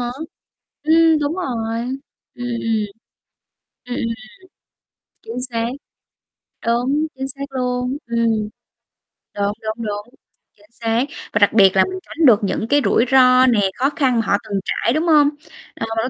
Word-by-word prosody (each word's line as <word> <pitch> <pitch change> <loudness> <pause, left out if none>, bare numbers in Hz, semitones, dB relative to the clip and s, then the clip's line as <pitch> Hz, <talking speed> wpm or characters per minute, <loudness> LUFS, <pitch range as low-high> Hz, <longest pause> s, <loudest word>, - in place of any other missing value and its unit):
há, 240 0 -2 0.7
ừm, 320 0 +5
đúng 290 +1 -1
rồi. 230 -10 -3 0.6
Ừm, 245 - -6
ừm, 240 -1 -2
ừm. 220 -2 0 1.0
Ừm, 250 0 -4
ừm, 230 0 -2 1.1
chính 235 +3 -6
xác. 230 0 -1 1.0
Đúng, 255 +7 +1
chính 265 - -3
xác 275 +1 -10
luôn, 250 0 -2
ừm. 230 0 0 1.1
Đúng, 200 0 0
đúng, 220 +1 -3
đúng, 210 +4 -6 0.4
chính 210 +1 -25
xác, 230 +1 -1 0.3
và 205 - +2
đặc 205 0 +4
biệt 195 -3 +6
là 190 - +6
mình 375 0 -5
tránh 325 -1 -1
được 225 -5 +6
những 215 +2 -1
cái 285 +2 +3
rủi 235 - +3
ro 255 -1 +6
nè, 210 -6 +3
khó 270 +2 +2
khăn 260 -7 +2
mà 225 - -1
họ 200 +1 +2
từng 205 -3 -2
trải, 235 - 0
đúng 315 +4 0
hông? 300 -3 +5 0.5
Ờ, - - -3
mình 225 - +1
có - - -2
240 Hz, 165 wpm, -20 LUFS, 225-270 Hz, 1.1 s, biệt